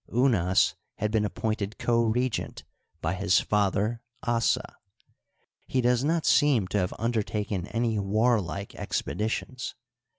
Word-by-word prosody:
Unas 110 -8 +3 0.2
had 105 0 -2
been 110 -1 +2
appointed 110 0 -2
co 115 -1 +2
regent 120 +1 -1 0.4
by 80 +2 0
his 95 0 +3
father 105 +2 0 0.2
Assa. 115 -1 0 0.9
He 130 - 0
does 125 0 +2
not 160 +2 +1
seem 140 -9 +4
to 105 - +1
have 90 -1 -1
undertaken 105 -4 -1
any 115 -1 0
warlike 100 -2 0
expeditions. 115 +4 -3
110 Hz, 120 wpm, -27 LUFS, 100-120 Hz, 0.9 s, seem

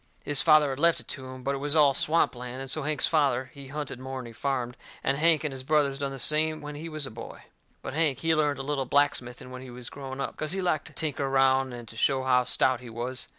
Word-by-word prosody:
His 145 -2 +2
father 155 -3 +5
had 135 - -5
left 170 +1 +4
it - - -11
to 130 -1 -6
him, 130 0 -9
but 140 - 0
it 135 - -3
was 145 +2 -1
all 145 -3 +6
swamp 160 +4 +3
land, 125 +1 -7
and 135 -1 -5
so 155 - 0
Hank's 150 0 +1
father, 135 -5 +1
he 140 -1 -10
hunted 145 -2 -5
more'n 130 -1 -6
he 120 - -9
farmed, 125 0 -2 0.3
and 135 - +2
Hank 165 -1 +4
and 155 - -1
his 130 -1 -7
brothers 140 -1 +2
done 140 -1 -2
the 135 - -6
same 155 +4 +2
when 150 0 -7
he 155 +3 -7
was 155 -2 -2
a 135 - -7
boy. 115 +1 -9 0.4
But - - -5
Hank, 155 -4 +1
he 165 +4 +1
learnt 150 -2 +2
a 135 - -4
little 140 -1 -1
blacksmithing 130 -2 0
when 130 0 -7
he 130 - -10
was 120 0 -7
growing 135 -1 -7
up, - - -3
cause 155 +1 -3
he 195 - -2
liked 155 -5 0
to 155 - -13
tinker 145 -1 -2
around 135 -1 +3
and 120 -1 -8
to 115 - -10
show 130 +3 +2
how 125 -1 +3
stout 130 0 +2
he 125 -2 -10
was. 120 +3 -2
135 Hz, 270 wpm, -27 LUFS, 130-150 Hz, 0.4 s, all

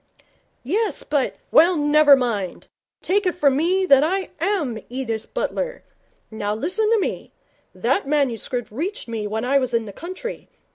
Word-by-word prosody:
'Yes, 405 - -1
but 290 -3 -1
' - - -41
'Well, 340 +3 +5
never 295 -1 +6
mind. 220 -8 -2 0.4
Take 400 +1 +1
it 360 - 0
from 285 -6 +3
me 365 +6 +2
that 275 -5 +6
I 375 +4 -1
am 320 - -1
Edith 235 -3 -4
Butler. - - -3 0.5
Now 210 -1 -2
listen 425 - 0
to 455 -1 +3
me. - - -4 0.4
That 390 - 0
manuscript 250 -5 -1
reached 335 - -4
me 225 -2 -3
when 220 +3 -3
I 275 +2 +3
was 255 -2 -1
in 230 -1 0
the 200 - -9
country. 370 - -7
285 Hz, 160 wpm, -22 LUFS, 235-370 Hz, 0.5 s, never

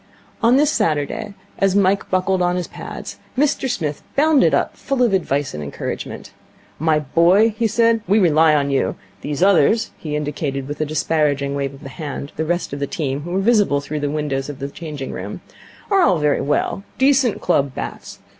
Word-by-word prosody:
On 235 +2 +5
this 295 +1 +3
Saturday, 165 - -1 0.2
as 195 -1 +2
Mike 200 0 +2
buckled 185 0 +1
on 180 0 +2
his 180 -1 -2
pads, - - -8 0.2
Mr 275 -1 +1
Smith 150 -10 -2
bounded 295 -1 +4
up, - - 0
full 275 -2 -1
of 235 -5 +2
advice 145 -6 0
and 75 - -5
encouragement. 70 - -6 0.5
'My 160 0 +2
boy,' 175 +9 +4
he 230 0 +1
said, 230 +1 +2
'we 205 - +4
rely 160 -5 +4
on 140 -1 +1
you. 135 - 0 0.3
These 145 +3 -2
others' 200 +4 +3
he 150 -2 -4
indicated 145 -2 -3
with 145 +1 -5
a 155 - 0
disparaging 145 -2 0
wave 140 -1 -3
of 140 - -15
the 135 - -7
hand 140 +1 -6
the 160 - -2
rest 175 -2 -2
of 140 - -4
the 140 - -2
team, 145 -7 -2
who 165 - -7
were 190 - +1
visible 205 -9 +3
through 150 +1 -4
the 145 0 -1
window 150 -2 -1
of 135 +1 -6
the 140 +1 -5
changing 150 -3 -7
room - - -6 0.5
'are 390 -1 +5
all 185 - +4
very 150 -1 +1
well. 150 +6 -1
Decent 265 -3 +3
club 140 -6 +1
bats. - - -6
160 Hz, 190 wpm, -20 LUFS, 145-200 Hz, 0.5 s, On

